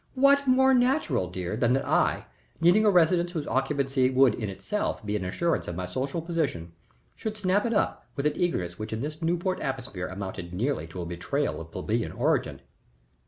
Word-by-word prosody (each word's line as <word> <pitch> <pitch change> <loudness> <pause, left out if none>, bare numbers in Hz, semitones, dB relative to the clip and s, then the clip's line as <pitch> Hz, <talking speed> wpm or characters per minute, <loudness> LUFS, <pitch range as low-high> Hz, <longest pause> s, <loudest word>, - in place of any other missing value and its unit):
What 280 +1 +4
more 265 +1 +5
natural, 245 - +2
dear, 90 +1 -4
than 120 +1 +2
that 135 - 0
I, - - +2 0.3
needing 175 +6 +5
a - - +6
residence 175 -1 +3
whose 155 -4 -3
occupancy 135 -1 +1
would 130 -2 +4
in 105 -2 -4
itself 160 - -3
be 105 0 -1
an 105 - -2
assurance 165 - -1
of 85 - -4
my 90 +1 -3
social 135 - -3
position, 150 - -2 0.4
should 220 -1 -5
snap 200 +2 +1
it 230 - -1
up - - 0
with 140 - -3
an 150 - +3
eagerness 90 - -1
which 110 +1 -5
in 110 - -3
this 150 +3 -5
Newport 175 +3 0
atmosphere 130 -10 -4
amounted 95 -2 -6
nearly 120 - -1
to 85 +2 -6
a - - -6
betrayal 90 - -2
of 80 - -10
plebeian - - -2
origin?" - - 0
140 Hz, 190 wpm, -27 LUFS, -, 0.4 s, a